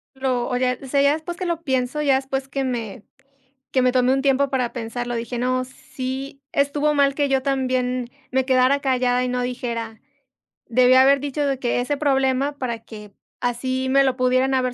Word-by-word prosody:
Pero, 255 -2 -1
oye, 250 0 0
o 270 - -8
sea, 280 +2 +2
ya 280 +1 +4
después 320 +2 -5
que 370 - -4
lo 335 -1 -2
pienso, 260 +1 -1
ya 280 -3 +3
después 270 0 -2
que 270 +1 -3
me 230 -6 -4 0.7
que 260 - +2
me 250 - +3
tomé 255 0 +3
un 270 - +1
tiempo 275 0 +2
para 250 -3 -1
pensarlo, 240 0 -4
dije: 235 +1 -4
"No, 255 +1 0
sí 265 +2 -7
estuvo 290 +1 +1
mal 280 -1 +2
que 285 -1 0
yo 270 -1 +2
también 255 -2 -1 0.2
me 265 0 +1
quedara 260 +2 +3
callada 250 -2 +1
y 250 - -1
no 250 0 -1
dijera". 235 -3 -4 0.7
Debí 250 +1 +4
haber 270 +2 +6
dicho 290 +1 -2
de 275 -1 0
que 245 -1 0
ese 290 +4 -1
problema 275 0 +1
para 240 -4 -3
que 210 -2 -11 0.3
así 255 +2 -1
me 275 +1 +5
lo 260 -1 0
pudieran 255 +1 +2
haber 255 -1 +1
260 Hz, 195 wpm, -22 LUFS, 250-275 Hz, 0.7 s, haber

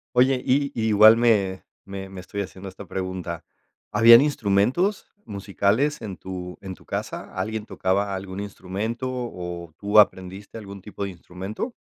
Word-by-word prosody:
Oye, 130 +1 +4
y 140 +2 +1
igual 110 0 +7
me 105 -5 +2 0.2
me 95 -1 -7
me 95 -1 -9
estoy 100 +3 -5
haciendo 95 0 -8
esta 95 - -9
pregunta, 90 -3 -5 0.5
¿habían 115 +2 +9
instrumentos 140 - +1 0.2
musicales 100 +8 0
en 100 -5 -6
tu 90 -1 -7
en 95 -1 -7
tu - - -21
casa? - - -5
¿Alguien 110 +3 -3
tocaba 100 0 0
algún 95 0 -5
instrumento 105 +5 -4
o 90 -9 -6
tú 105 +1 +4
aprendiste 95 +2 +1
algún 100 -2 -9
tipo 100 0 -6
de 100 - -5
instrumento? 95 - -6
100 Hz, 145 wpm, -24 LUFS, 95-115 Hz, 0.5 s, habían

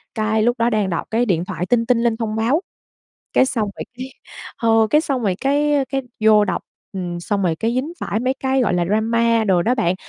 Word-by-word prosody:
cái 220 0 +1
lúc 240 +2 +1
đó 230 +1 +3
đang 210 -4 0
đọc 170 - -3
cái 235 +2 +2
điện 175 -6 0
thoại 180 - -4
tinh 230 +3 +1
tinh 235 0 +2
lên 230 -2 +1
thông 220 -2 -3
báo, 240 +10 +1 0.7
cái - - +5
xong 225 -5 -1
rồi - - -4
cái, 255 - -5 0.5
ờ, 225 -1 +3
cái 300 +6 +4
xong 275 -5 -2
rồi 190 -3 +1
cái 285 0 +2
cái 270 0 -1 0.2
vô 210 -1 +6
đọc, - - -2 0.3
ừm, 175 -2 -4
xong 195 +3 -2
rồi 165 -3 +1
cái 230 +1 -1
dính 285 +7 -2
phải 215 - -2
mấy 255 +2 0
cái 265 0 0
gọi 205 - +1
là 175 -1 +1
drama 230 +3 +2
đồ 185 -4 +2
đó 245 +6 +1
bạn, 185 -7 +1
225 Hz, 230 wpm, -20 LUFS, 205-255 Hz, 0.7 s, vô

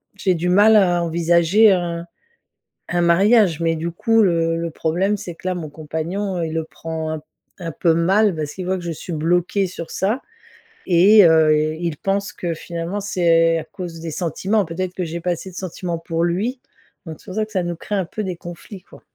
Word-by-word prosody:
j'ai 190 -2 +1
du 175 +1 -1
mal 205 +4 +6
à 175 -3 +3
envisager 170 +5 +4
un 170 -2 -1 0.8
un 175 0 0
mariage. 185 0 +4
Mais 165 0 +1
du 165 +2 -3
coup 225 +6 +2
le 165 -3 +2
le 170 0 -3
problème 185 +7 0
c'est 175 -3 -7
que 185 - -9
là 185 - 0
mon 160 -4 -5
compagnon, 170 +6 -4
heu, 165 - -1
il 160 - -5
le 160 0 -1
prend 160 -1 -5
un 155 - -2
p 150 - -24 0.3
un 170 -3 -5
peu 165 +1 +2
mal 190 +3 +3
parce 150 -2 -4
qu'il 185 -1 -6
voit 190 0 0
que 175 - -8
je 170 - -3
suis 165 - -7
bloquée 175 +5 +1
sur 170 -2 -7
ça. 215 +7 -1 0.6
Et 195 +4 +6
heu, 160 -2 +5 0.2
il 170 -4 -3
pense 200 +1 -2
que 175 -2 -3
finalement 170 +4 -5
c'est 165 -4 +3
à - - -6
cause 170 -2 -8
des 165 0 -6
sentiments 190 +6 0
peut-être 180 +2 -4
que 185 - -3
j'ai 170 +1 -5
pas 180 +1 0
assez 175 +2 -5
de - - -16
sentiments 180 -2 -4
pour 165 0 -2
lui 210 +10 -1 0.4
donc 160 -2 -8
c'est - - -21
pour 185 - -8
ça 215 0 0
que 215 - -20
ça 185 -3 0
nous 175 0 -3
crée 205 +4 -4
un 190 - 0
peu 215 +5 -5
des 185 -2 -3
conflits 175 +3 -10
quoi. - - -17
175 Hz, 220 wpm, -20 LUFS, 165-190 Hz, 0.8 s, mal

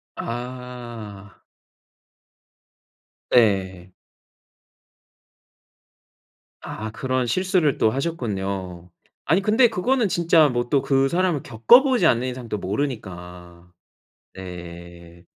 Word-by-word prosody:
아. 120 -4 -8 1.9
네. 95 -6 +1 2.7
아 110 0 -6
그런 130 +2 -2
실수를 180 - +1
또 110 - +3
하셨군요. 100 - -4 0.4
아니 170 +6 +2
근데 220 +4 +4
그거는 235 +3 0
진짜 165 -4 +3
뭐 120 -1 -2
또 140 -2 +2
그 135 0 +1
사람을 175 -5 0
겪어보지 240 - +4
않는 125 +1 +1
이상 125 -2 -7
또 105 - -2
모르니까. 90 -6 -6 0.6
네. 85 -1 -11
120 Hz, 165 characters per minute, -22 LUFS, 95-145 Hz, 2.7 s, 근데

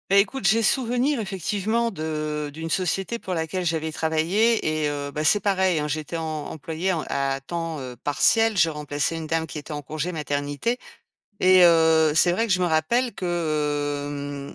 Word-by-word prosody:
Bah, 195 - +4
écoute, 205 +7 +1
j'ai 225 +1 +4
souvenir 250 +3 +1
effectivement 210 +4 -1
de 155 -4 -3
d'une 160 +2 -6
société 190 +6 -1
pour 190 -5 -5
laquelle 170 +2 -2
j'avais 160 -1 -1
travaillé 160 +1 +1
et 150 - +1
heu, 145 -1 -4
bah, 150 +1 -3
c'est 205 +7 +4
pareil, 190 -4 +1
hein. 150 - -2
J'étais 155 +2 -3
em - - -3 0.3
employée 160 +4 -3
en 165 -4 -2
à 135 0 -1
temps, 165 +2 -4
heu, 130 -2 -7
partiel, 225 +9 +3
je 165 - +4
remplaçais 150 0 -2
une 160 -1 -5
dame 160 +1 -1
qui 145 - -7
était 150 +2 -8
en 145 -1 -4
congé 155 +5 -4
maternité, 145 - -2 0.6
et 185 0 +7
heu, 160 -2 +5
c'est 175 +2 +4
vrai 225 +6 0
que 210 - +1
je 185 - +2
me - - +2
rappelle 225 +10 +1
que, 145 -4 -2
160 Hz, 180 wpm, -24 LUFS, 150-190 Hz, 0.6 s, et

